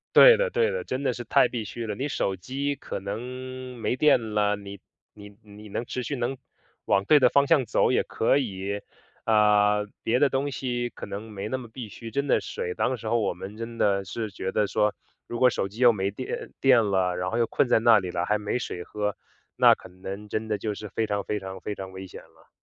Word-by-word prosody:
对 - - +10
的 - - +1
对 470 0 +1
的， 485 - -3
真 130 - -3
的 135 - +1
是 120 0 -6
太 120 - +4
必 115 -3 -4
需 115 +2 -6
了， 105 - -3
你 135 - -2
手 95 -8 -1
机 140 +9 -3
可 - - -6
能 125 +5 -6
没 120 +2 -1
电 120 -7 +3
啦， 105 -1 +2
你 100 -1 -8 0.3
你 105 -1 -12
你 105 0 -13
能 115 +4 -3
持 125 - -4
续 145 - -3
能 125 +1 -2 0.5
往 100 - +2
对 150 +7 +6
的 125 - +5
方 140 +2 +3
向 150 -6 +4
走 110 - +2
也 125 - +2
可 115 +5 +2
以， 100 -5 -3 0.4
呃， 105 -1 +4 0.2
别 125 +4 +2
的 145 - +5
东 135 +1 -1
西 120 -2 -2
可 - - -9
能 105 +2 -7
没 100 +1 -5
那 130 - -2
么 125 - -8
必 115 0 -8
需， 115 +2 -9
真 140 +1 -1
的 - - +3
水 460 -2 -4
当 130 - 0
时 110 -1 -6
候 120 - +2
我 105 - 0
们 100 +4 -8
真 115 +1 -6
的 100 -3 +2
是 105 +3 -4
觉 95 0 -4
得 105 -2 +1
说， 105 +2 +1 0.3
如 120 - -5
果 125 - +6
手 95 - -1
机 100 +3 -11
又 120 -2 +7
没 100 -1 -2
电 130 +5 -6
呃， - - -8
电 125 -4 +5
了， 95 -2 +1
然 90 +1 -2
后 115 - -2
又 120 - +3
困 - - +2
在 120 - +3
那 115 -2 +6
里 90 -2 -4
啦， 85 0 -1
还 105 +3 +1
没 105 +3 -2
水 90 -6 -5
喝， 105 -1 -3 0.4
那 - - +7
可 - - -14
能 95 +3 -8
真 110 +1 -2
的 105 -2 -1
就 105 +1 -3
是 105 - -7
非 110 +3 -1
常 100 -1 -1
非 105 - -2
常 95 -1 -7
非 105 - -4
常 95 -1 -7
危 95 0 -8
险 - - -11
了。 - - -24
110 Hz, 265 characters per minute, -26 LUFS, 100-125 Hz, 0.5 s, 对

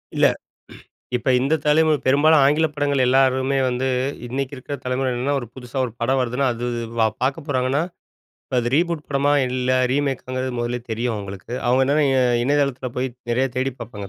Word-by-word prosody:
இல்ல. - - +5 0.9
இப்ப 125 +1 -1
இந்த 135 +4 +1
தலைமுறை 155 0 +4
பெரும்பாலும் 145 +3 +5
ஆங்கில 150 +4 +3
படங்கள 145 -2 0
எல்லாருமே 130 +1 +3
வந்து, 125 +1 -1 0.4
இன்னைக்கு 130 +2 -3
இருக்க 140 +3 -6
தலைமுறை 130 +1 0
என்னன்னா, 135 +4 -1
ஒரு 120 - -7
புதுசா 125 0 -8
ஒரு 120 - -6
படம் 130 +3 +2
வருதுனா, 125 +2 -1
அது 120 +1 -5 0.3
வா 110 - +5 0.2
பார்க்க 140 +3 -1
போறாங்கன்னா, 130 +2 +1 0.7
இப்போ 130 - -3
அது 120 +2 -2
ரீபூட் 170 -2 0
படமா? 140 +1 +2 0.2
இல்ல 125 0 -1 0.2
ரீமேக்காங்கிறது 130 -2 -2
முதல்லேயே 120 0 -2
தெரியும் 115 +1 -1
அவங்களுக்கு. 100 +1 -8 0.2
அவங்க 130 +2 +4
என்னன்னா 145 +2 +2
இ - - +1 0.3
இணையதளத்துல 140 -2 0
போய் 130 +1 0 0.2
நெறைய 130 +3 +2
தேடிப் 130 0 -2
பார்ப்பாங்க, 105 -4 -7
130 Hz, 165 wpm, -22 LUFS, 125-140 Hz, 0.9 s, இல்ல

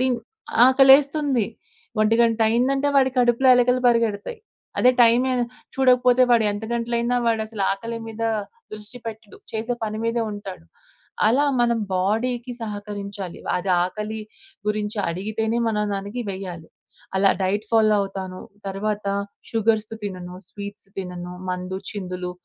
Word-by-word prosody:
టివ్ 255 -2 +1 0.5
ఆకలేస్తుంది. 270 -2 +5 0.5
ఒంటి 215 +1 +4
గంట 230 -1 +2
అయిందంటే 270 +5 +2
వాడి 265 -1 +5
కడుపులో 245 +1 +4
ఎలకలు 250 +1 +3
పరిగెడతాయి. 230 - 0 0.4
అదే 250 - +6
టైమే 240 +3 +4 0.4
చూడకపోతే, 250 -1 +4
వాడెంత 215 -2 +2
గంటలైనా 235 +1 0
వాడసల 220 -2 -1
ఆకలి 230 +4 -5
మీద 225 +1 -6 0.5
దృష్టి 215 +3 -7
పెట్టడు. 220 -1 -8 0.2
చేసే 225 +2 -2
పని 215 0 -4
మీదే 230 0 0
ఉంటాడు. 200 - -8 0.6
అలా 255 +7 +4 0.2
మనం 235 -1 +2 0.2
బాడీకి 235 +6 0
సహకరించాలి. 205 -3 -6 0.2
అది 185 +1 -2
ఆకలి 210 +4 -4 0.5
గురించి 210 0 -1
అడిగితేనే 215 +6 -1
మనం 210 -1 0
దానికి 200 +5 -4
వేయాలి. 185 -4 -6 0.5
అలా 195 0 +5
డైట్ 205 +3 0
ఫాలో 220 -2 +4
అవుతాను. 190 -2 -5 0.3
తర్వాత 205 +1 -2 0.4
షుగర్స్ 220 -1 +1
తినను, 180 -3 -6
స్వీట్స్ 200 -1 -8
తినను, 180 -2 -5 0.2
మందు 180 +1 -3
చిందులు 180 -3 -5
220 Hz, 120 wpm, -23 LUFS, 200-240 Hz, 0.6 s, అదే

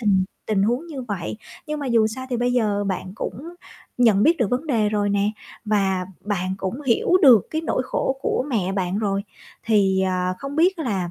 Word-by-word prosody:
tình 195 -4 +3 0.2
tình 205 -3 +1
huống 245 +10 0
như 290 -6 -6
vậy. 205 -5 -4 0.3
Nhưng 300 -1 -3
mà 280 - -3
dù 230 -3 +3
sao 260 +4 -5
thì 245 - 0
bây 245 +1 0
giờ 210 -4 +1
bạn 185 -1 -3
cũng 320 +10 -6 0.4
nhận 220 -5 +4
biết 330 +7 +4
được 230 -5 +1
vấn 255 +6 -1
đề 225 -8 +2
rồi 205 -1 0
nè, 200 +1 +1 0.3
và 195 -3 +1 0.2
bạn 190 -2 -2
cũng 195 +8 -4
hiểu 265 +4 +1
được 245 - +7
cái 315 - -1
nỗi 305 - -1
khổ 265 +1 -1
của - - 0
mẹ 195 -6 0
bạn 190 0 -1
rồi. 200 -2 -1 0.4
Thì, 200 -4 +3
à, 185 -1 0
không 275 +2 -6
biết 355 +2 +3
là 195 - -2
215 Hz, 205 wpm, -22 LUFS, 195-255 Hz, 0.4 s, được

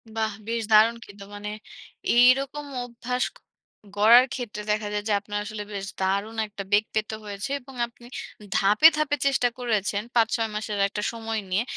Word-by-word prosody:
বাহ! 220 -1 0 0.2
বেশ 230 0 -1
দারুণ 220 +2 +6
কিন্তু 200 0 -12
মানে 205 0 -6 0.7
এইরকম 270 +4 +4 0.2
অভ্যাস 245 +1 -3
ক - - -51 0.6
গড়ার 230 +5 +8
ক্ষেত্রে, 235 -5 -5
দেখা 210 0 -1
যায় 205 0 -2
যে, 210 - +2
আপনার 205 0 -4
আসলে 210 -1 -5
বেশ 195 -1 -4 0.2
দারুণ 200 +4 0
একটা 205 -1 -7
বেগ 205 +1 +5
পেতে 215 0 -1
হয়েছে। 205 +5 -5
এবং 265 +2 -14
আপনি 235 0 -18 0.5
ধাপে, 210 +10 +6
ধাপে 305 -1 +1
চেষ্টা 270 -3 +3
করেছেন 210 -4 -1
৫-৬ 225 -1 +2
মাসের 210 -1 -3
একটা 210 +1 -5
সময় 225 -1 -4
নিয়ে 195 +5 +1
220 Hz, 165 wpm, -25 LUFS, 205-240 Hz, 0.7 s, গড়ার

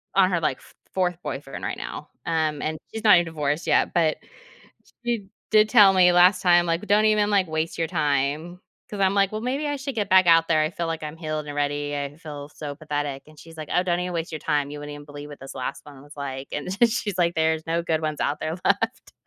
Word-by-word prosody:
on 190 -1 +5
her, 175 - +1
like, 150 -5 0
f - - -19 0.2
fourth 180 -2 0
boyfriend 135 0 -6
right - - -3
now, - - -7 0.2
um, 155 -3 0
and 155 0 -2 0.2
she's 220 - -5
not 210 -3 +8
even 175 - +3
divorced 150 0 -2
yet, - - +2
but 160 -3 +2 0.9
she 230 -5 -1 0.2
did 215 0 +5
tell 205 -5 +7
me 180 -2 +5
last 180 +1 +5
time, 175 -1 +5
like, 165 +1 0
"W 210 - -8
don't 210 +2 +4
even, 210 -1 +2
like, 195 -2 +3
waste 160 +1 -2
your 165 -1 -1
time," 155 +2 -1 0.3
'cause 205 - -6
I'm 190 0 +3
like, 195 0 +2
"Well, 215 - -3
maybe 270 +5 -2
I 290 0 -1
should 270 -2 -5
get 205 -3 -1
back 185 -1 +6
out 165 -1 +6
there. 155 -2 +3
I 155 0 +1
feel 170 -1 -4
like 165 -1 -4
I'm 150 +1 -6
healed 155 -2 -4
already. 145 0 -2
I 140 0 -4
feel 145 -3 -8
so 145 -2 -7
pathetic." 145 -3 -4
And 155 0 -18
she's 165 +2 -13
like, 155 -1 -7
"Oh, 180 - +3
don't 175 -1 0
even 180 0 -3
waste 165 -1 -3
your 155 - -3
time. 145 -1 -1
You 150 - -7
wouldn't 145 0 -7
even 145 0 -10
believe 145 0 -9
what 145 -2 -11
this 135 - -9
last 130 +1 -5
one 140 -2 -13
was 145 +1 -15
like." 135 -1 -5
And 145 +4 -4
then 205 +6 +3
she's 205 -4 -3
like, 170 -1 +2
"There's 160 0 0
no 165 +1 0
good 160 -2 0
ones 155 -1 -3
out 145 - 0
there 160 +2 -3
left." 225 +5 0
165 Hz, 250 wpm, -24 LUFS, 145-185 Hz, 0.9 s, not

